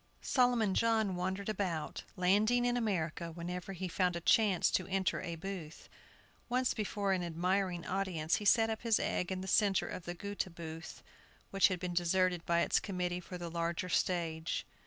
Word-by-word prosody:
Solomon 245 -6 +3
John 220 -4 +2
wandered 190 +2 -2
about, 185 -7 -2
landing 210 +7 +3
in 245 0 +2
America 170 -7 -1
whenever 180 +3 -5
he 185 0 -4
found 180 0 +1
a - - -2
chance 195 +1 +3
to 185 - 0
enter 190 -1 0
a 170 - -4
booth. 170 -2 -7 0.6
Once 255 +1 +1
before 205 -2 -1
an 185 - 0
admiring 175 +1 -1
audience 180 -4 0
he 210 - -6
set 225 +1 +5
up 220 - -4
his 230 -2 +2
egg 180 - -1
in 185 0 -2
the 190 - -6
centre 195 -1 +3
of 180 - -6
the 175 - -4
Goethe 200 -1 -4
Booth, 165 -1 -8 0.5
which 195 -1 +5
had 185 -2 -2
been 180 -1 -3
deserted 180 0 +2
by 170 0 +3
its - - +3
committee 180 -2 -2
for 180 0 -8
the 170 -1 -6
larger 170 +2 -2
stage. 165 -2 -1
185 Hz, 180 wpm, -33 LUFS, 170-200 Hz, 0.6 s, set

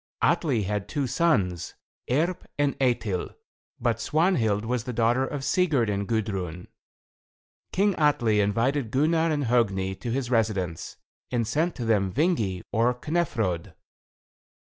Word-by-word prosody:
Atli 130 -10 +2
had 100 +1 -3
two 145 -3 -1
sons, 100 - 0 0.3
Erp 170 +8 0
and 145 -1 +1
Eitil, 115 -8 0 0.4
but 115 -2 0
Svanhild 115 - +1
was 120 0 -1
the 125 - -4
daughter 120 +3 +2
of 140 -1 -5
Sigurd 140 - +2
and 100 0 -2
Gudrun. 95 -6 -2 1.0
King 200 +1 +2
Atli 120 -8 +3
invited 115 +6 +1
Gunnar 160 +6 +2
and 150 -2 0
Hogni 100 -6 +1
to 120 - -5
his 125 +1 -2
residence, 100 -8 -1 0.3
and 120 -2 0
sent 155 +10 0
to 120 - -4
them 100 -4 +2
Vingi, 115 - 0
or 120 +2 +2
Knefrod. 120 - -2
120 Hz, 130 wpm, -26 LUFS, 105-145 Hz, 1.0 s, Atli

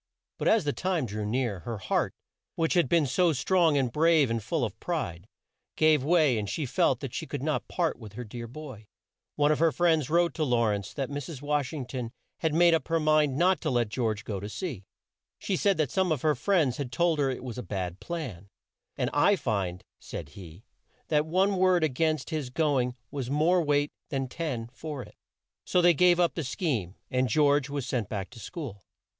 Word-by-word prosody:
But - - -1
as 220 -3 +4
the 145 -1 -1
time 180 -6 -1
drew 105 -1 -4
near, 120 -4 -1
her 115 +3 -5
heart, 95 - -1 0.4
which 165 -1 +1
had 175 -8 +3
been 165 -3 +4
so 165 +6 +2
strong 160 +2 +3
and 130 -3 +1
brave 155 -5 +4
and 115 -1 -1
full 135 +5 -1
of 105 - -7
pride, 100 - -3 0.5
gave 155 -3 +4
way 150 -6 +3
and 105 -1 -4
she 155 - -2
felt 125 - +1
that - - -5
she - - -4
could - - -5
not - - -1
part - - -1
with 105 -2 -10
her 125 - -6
dear 115 +1 -7
boy. 125 -5 -10 0.5
One 145 0 +3
of 155 - +1
her 165 0 +4
friends 160 -5 +2
wrote 170 +1 +3
to 160 - -1
Law 120 -5 +2
rence 100 -1 -2
that 135 0 -3
Mrs. 145 0 -6
Wash 145 -2 0
ing 145 -5 -4
ton 125 -2 -5 0.3
had 160 - +1
made 170 +2 +5
up 165 - +1
her 165 0 +1
mind 155 -3 +3
not 180 0 +3
to - - -1
let 120 -4 +1
George 110 -2 -1
go 100 -3 -4
to 100 +2 -6
sea. 115 - -5 0.5
She 195 - -2
said 195 +1 +2
that 155 -5 0
some 190 -2 +1
of 150 -5 -1
her 155 -1 +4
friends 150 -3 +1
had 135 -4 -4
told 170 -1 +1
her 140 -2 +2
it 130 - -4
was 125 -2 -6
a - - -2
bad 90 -2 -4
plan, 125 - -6 0.5
and - - 0
"I 175 +8 +4
find," 95 - -2 0.2
said 75 -4 -7
he 85 +5 -12 0.4
"that 150 0 +2
one 190 +4 +2
word 185 -2 +4
a 155 - +3
gainst 155 +3 -1
his 150 -5 -2
go 145 0 +1
ing 125 0 -3 0.2
has 135 -4 -3
more 160 +6 +3
weight 145 -1 +1 0.2
than 135 -3 -2
ten 130 -5 -3
for 145 -1 -6
it." - - -15 0.5
So 180 - +1
they 175 0 +6
gave 175 +2 +4
up 175 -1 +3
the 165 - -3
scheme, 125 - -2 0.2
and 130 0 +1
George 145 +1 +3
was 140 -3 -3
sent 125 -5 -2
back 100 -3 -4
to 120 - -12
school. 125 - -7
145 Hz, 220 wpm, -28 LUFS, 120-165 Hz, 0.5 s, they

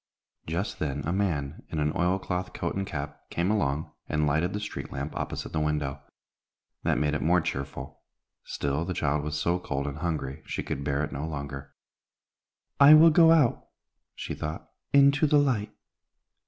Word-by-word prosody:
Just 85 +6 -3
then 70 -2 -2
a 85 - -1
man, 80 -8 -1
in 80 - -4
an 75 0 +1
oil 90 +2 +2
cloth 90 -1 -4
coat - - -3
and 95 0 -2
cap, 70 -4 -5
came 85 +4 0
along, 75 -7 0 0.2
and 75 -1 +1
lighted 80 +5 +1
the 105 - -3
street 105 - -6
lamp 70 +3 -5
opposite - - -4
the 80 - 0
window. 75 -2 -1 0.8
That - - +1
made 75 0 +1
it 75 - -1
more 90 +3 +4
cheerful; 70 -4 -5 0.4
still, 70 +3 -2
the 90 +1 -3
child 75 0 0
was 75 0 -3
so 85 +3 +1
cold 70 -5 -3
and 70 +1 -5
hungry, 80 -4 -3
she - - -3
could 70 - -4
bear 70 +1 0
it 75 - -3
no 75 +4 -4
longer. 70 -2 -6 1.0
"I 145 +2 +10
will 160 +1 +8
go 165 +1 +7
out," 150 -8 +3 0.5
she - - -5
thought, 75 +1 -6 0.2
"into 140 +2 +5
the 150 - +4
light. 125 -7 +1
80 Hz, 180 wpm, -27 LUFS, 70-95 Hz, 1.0 s, I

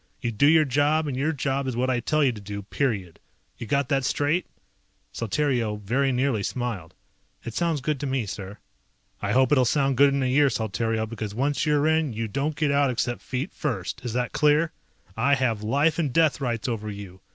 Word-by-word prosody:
You 120 -3 -2
do 115 +6 +3
your 155 0 +6
job, 145 +4 +2
and 140 -3 -3
your 140 +5 0
job 135 -2 -2
is 130 - -2
what 130 +2 +1
I 125 - +1
tell 155 +5 +1
you 135 - +4
to 110 -3 -9
do, 100 0 -6
period. 100 - -2 0.4
You 115 - -6
got 140 +3 +1
that 135 -3 +1
straight?" 145 +6 0 0.7
Saltario 120 -2 0
very 130 +7 0
nearly 125 -3 +1
smiled. 105 -7 -4 0.5
"It 115 - -6
sounds 165 -2 0
good 150 +1 -1
to 145 - -3
me, 130 -3 -1
sir." 100 +1 -7 0.6
"I - - -1
hope 130 +1 +3
it'll 135 -3 +5
sound 135 +1 +1
good 140 +1 +6
in 140 -1 0
a - - +1
year, 140 +3 +4
Saltario, 110 0 -1
because 110 -2 -6
once 140 +5 0
you're 150 -1 +3
in 160 -4 +1
you 115 +1 -3
don't 140 +7 -2
get 150 -2 +1
out 140 -1 +3
except 120 0 -2
feet 130 0 -4
first. 115 - -3
Is 120 -3 -4
that 125 0 -1
clear? 150 +2 +3 0.4
I 140 +5 +3
have 120 -6 0
life 145 +9 +1
and 150 -5 0
death 155 -1 +2
rights 120 -1 -2
over 110 -3 -3
you. 100 -3 -9
130 Hz, 210 wpm, -25 LUFS, 115-145 Hz, 0.7 s, your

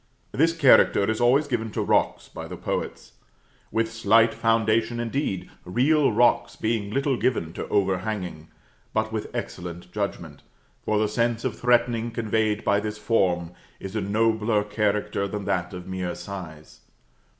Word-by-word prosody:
This 165 +4 +3
character 130 -8 +5
is 110 +1 -1
always 130 +5 +4
given 115 -4 -2
to - - -1
rocks - - +1
by - - -8
the - - -7
poets; - - -4 0.6
with 115 0 0
slight 115 +1 +4
foundation 115 +1 +1
indeed 120 -5 -2
real 135 - +2
rocks 120 +2 +2
being 110 -2 -1
little 135 +3 0
given 85 -12 -1
to - - -5
overhanging 95 -4 -1 0.5
but 110 0 0
with 110 -1 -4
excellent 90 0 -6
judgment; 85 -7 -4 0.4
for 110 - 0
the 105 0 +2
sense 115 +3 -1
of 120 -4 -1
threatening 120 -1 +2
conveyed 110 -2 -1
by 100 0 +2
this 105 0 -4
form 90 -6 +1 0.3
is 95 +2 -7
a 110 - 0
nobler 110 +1 +1
character 105 -1 -1
than 100 0 -5
that 90 -3 -1
of 90 -2 -8
mere 95 -2 -4
size. 85 -6 -9
110 Hz, 150 wpm, -25 LUFS, 95-115 Hz, 0.6 s, character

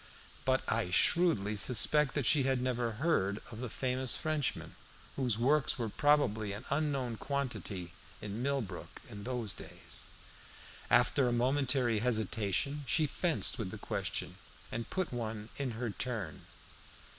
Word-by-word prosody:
But 130 0 +2
I 110 -4 +1
shrewdly 105 - +4
suspect 125 +6 +3
that 145 -4 0
she 150 +5 +6
had 135 -1 +2
never 125 -2 -1
heard 110 - +1
of 110 - -8
the 125 -1 -4
famous 130 +2 -1
Frenchman, 155 -3 -1 0.4
whose 125 -6 +2
works 135 +4 +2
were 115 -3 -2
probably 110 -7 +2
an 105 - -7
unknown 140 -5 0
quantity 115 -11 -3 0.3
in 105 +2 -5
Millbrook 130 -9 -3
in 100 -1 -8
those 120 -5 -1
days. - - -8 0.8
After 125 +2 +4
a - - +1
momentary 125 -1 +2
hesitation 115 +4 0
she 155 +3 +4
fenced 150 -3 0
with 105 -5 -2
the - - -7
question, - - -2 0.3
and 115 0 -4
put 185 -7 -2
one 110 -2 -4
in 135 -4 -2
her 120 -2 -2
turn. 105 -9 -4
125 Hz, 140 wpm, -33 LUFS, 110-140 Hz, 0.8 s, she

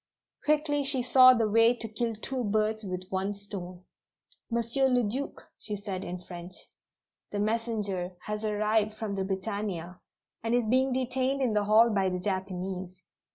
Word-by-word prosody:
Quickly 300 -1 +2
she 270 -2 +2
saw 255 +1 +8
the 225 -2 +2
way 230 +3 +5
to 230 -1 -5
kill 225 +1 -2
two 255 +4 -3
birds 215 +1 0
with 185 -2 -4
one 195 +2 -1
stone. 185 -3 -7 0.7
"Monsieur 235 +3 +1
le 250 -2 +3
Duc," 255 +7 -3 0.2
she 210 - -5
said 200 -2 -5
in 180 - -4
French. 175 0 -9 0.7
"The 205 - -4
messenger 210 -4 -1
has 210 0 -3
arrived 215 0 +1
from 215 -2 -4
the 195 -1 -1
Britannia, 190 -2 -3 0.4
and 230 +1 0
is 245 -2 +2
being 260 +4 +2
detained 260 +1 0
in 240 -4 +1
the 210 -1 +2
hall 220 +3 +6
by 195 -2 +2
the 180 - -2
Japanese. 185 -1 -4
215 Hz, 160 wpm, -29 LUFS, 190-240 Hz, 0.7 s, saw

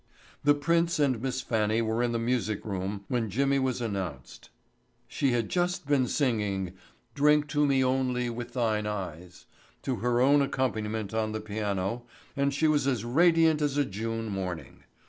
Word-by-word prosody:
The 145 0 +5
prince 170 +3 +1
and 135 -6 +1
Miss 130 0 -2
Fannie 110 -1 +1
were 110 +1 0
in 120 -1 +1
the 115 - 0
music 115 -3 -1
room 100 0 -4
when 120 -3 -1
Jimmy 135 +6 +1
was 130 -2 -1
announced. 95 - -5 0.6
She 140 -3 0
had 115 -3 0
just 180 -2 -1
been 140 -3 +2
singing 105 - 0 0.4
"Drink 150 +2 +3
to 145 -1 +2
Me 135 -1 +3
Only 130 -1 0
With 120 0 -6
Thine 110 -4 0
Eyes" 90 -4 -6 0.4
to 130 -3 -1
her 120 +3 +1
own 140 +3 +5
accompaniment 110 -6 -2
on 110 -1 -1
the 110 - -2
piano 105 +1 -3 0.3
and 140 0 +1
she 150 +3 +1
was 145 -3 +2
as 120 -5 0
radiant 165 +3 +4
as 145 -1 0
a 145 - +3
June 115 +2 -4
morning. 95 -5 -5
120 Hz, 165 wpm, -28 LUFS, 105-140 Hz, 0.6 s, The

